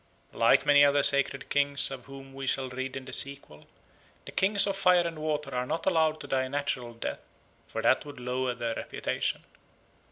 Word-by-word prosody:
Like - - +3
many 145 0 +6
other 145 0 +4
sacred 140 -1 +2
kings, 140 -1 +2
of 130 -3 -8
whom 135 -1 -12
we 135 0 -6
shall 130 0 -1
read 130 +1 -5
in 130 - -8
the 130 - -6
sequel, 140 - -2 0.6
the - - -9
Kings 200 +1 +3
of 200 -1 -1
Fire 180 -3 +4
and 165 -2 -7
Water 150 -3 -3
are 125 0 -2
not 160 +3 -3
allowed 160 -4 +2
to - - -8
die 130 -1 0
a - - -7
natural 125 -4 -3
death, 115 - -5 0.5
for - - -5
that - - +3
would 145 -3 -11
lower 125 0 -2
their 115 -1 -3
reputation. - - -3
140 Hz, 195 wpm, -28 LUFS, 130-150 Hz, 0.6 s, many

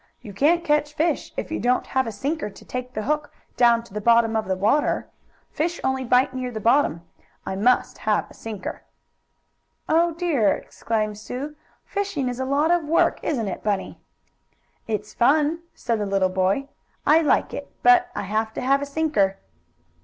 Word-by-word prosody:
"You 205 - -10
can't 330 - +3
catch 295 -2 +1
fish 320 0 0
if - - -4
you 320 - -2
don't 250 +1 +1
have 260 -2 0
a - - -3
sinker 275 +5 -3
to 200 - -15
take 250 0 -5
the 215 - -2
hook 300 +4 -1 0.2
down 235 -1 +4
to 235 - -17
the 210 - -3
bottom 230 0 +4
of 220 -2 -1
the 190 - 0
water. 220 +11 +1 0.4
Fish 340 +3 -2
only 265 0 0
bite 255 +1 +3
near 255 -1 -3
the 225 -3 -5
bottom. 230 - +2 0.4
I 190 - -3
must 240 +6 +2
have 215 -1 +1
a - - -16
sinker." 215 -4 -6 1.1
"Oh, 335 +1 +2
dear!" 310 - +2
exclaimed 215 -2 -3
Sue. 270 +7 -6 0.3
"Fishing 395 -10 -2
is 245 0 -5
a 260 - -1
lot 290 +5 +2
of 350 -2 +3
work; 320 +3 +2
isn't 240 -9 -1
it, 190 - -4
Bunny?" 205 -2 -2 0.9
"It's 210 -1 -3
fun," 300 +6 +3 0.2
said 230 -2 -1
the 205 - -2
little 195 -1 +2
boy. 190 +9 0 0.4
"I 315 +2 +6
like 305 - +2
it, - - -6
but 365 -1 +6
I 205 - -2
have 220 +3 -1
to - - -3
have 275 +2 +2
a 285 - -3
sinker." 280 -11 +1
250 Hz, 185 wpm, -23 LUFS, 215-300 Hz, 1.1 s, I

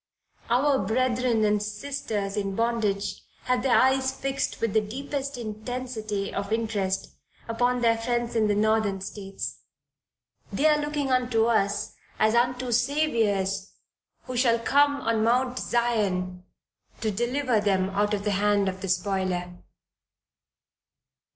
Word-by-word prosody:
Our 270 +3 +3
brethren 240 +1 +1
and 210 0 +2
sisters 210 -2 -3
in 195 -2 -2
bondage 225 -3 -1 0.2
have 250 -1 +1
their 255 -1 +3
eyes 265 0 +3
fixed 275 0 -3
with 230 -3 -1
the 220 - +4
deepest 275 +5 -4
intensity 220 -2 -4
of 200 +1 -3
interest 205 -4 -1 0.3
upon 245 +2 +1
their 230 -1 +3
friends 240 0 -1
in 220 -2 +3
the 205 - +2
Northern 215 -2 +2
States, 195 0 -6 0.9
they 295 - 0
are 300 -1 +5
looking 295 -2 -2
unto 245 -3 +2
us 215 -4 +1 0.2
as 215 0 +3
unto 245 +1 +1
"Saviours 225 -7 +1 0.5
who 255 - -6
shall 240 -1 +3
come 285 +4 +3
up - - -8
on 225 -1 +2
Mount 250 +2 +2
Zion" 190 -7 -1 0.5
to 220 -2 -1
deliver 240 +2 0
them 190 -2 +1
out 205 +1 +1
of 200 - -5
the 210 - 0
hand 200 0 +2
of 190 0 -3
the 195 - -4
spoiler. 180 -1 -1
225 Hz, 135 wpm, -26 LUFS, 200-250 Hz, 0.9 s, are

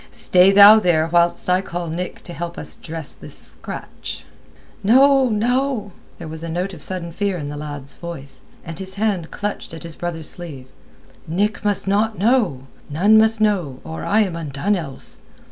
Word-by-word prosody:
"Stay 185 +1 +4
thou 205 +2 +9
there 165 -5 +2
whilst 170 0 +2
I 180 +1 +3
call 175 -2 -5
Nick 175 +3 -5
to 175 - -9
help 170 0 -6
us - - -6
dress 160 -2 -8
this - - -12
scratch." - - -8 0.6
"No, 265 +4 +5
no!" 235 0 0 0.3
There 170 - -8
was 160 0 -8
note 175 +4 -3
of 160 - -10
sudden 175 -1 -5
fear 195 +1 -2
in 145 -3 -5
the 145 - -6
lad's 145 -2 -4
voice, 140 -6 -9 0.2
and 165 +2 -7
his 190 0 -6
hand 200 -6 -1
clutched 205 -5 -5
at 165 - -10
his 165 -2 -5
brother's 165 -3 -4
sleeve. 155 -7 -6 0.6
"Nick 205 +6 -1
must 205 -2 0
not 215 +2 +1
know. 205 - +1 0.2
None 200 +9 +4
must 220 0 +4
know, 180 -12 0
or 160 - -7
I 215 +2 +2
am 190 -5 -1
undone 165 +5 -1
else." 155 -8 -8
180 Hz, 175 wpm, -20 LUFS, 160-205 Hz, 0.6 s, thou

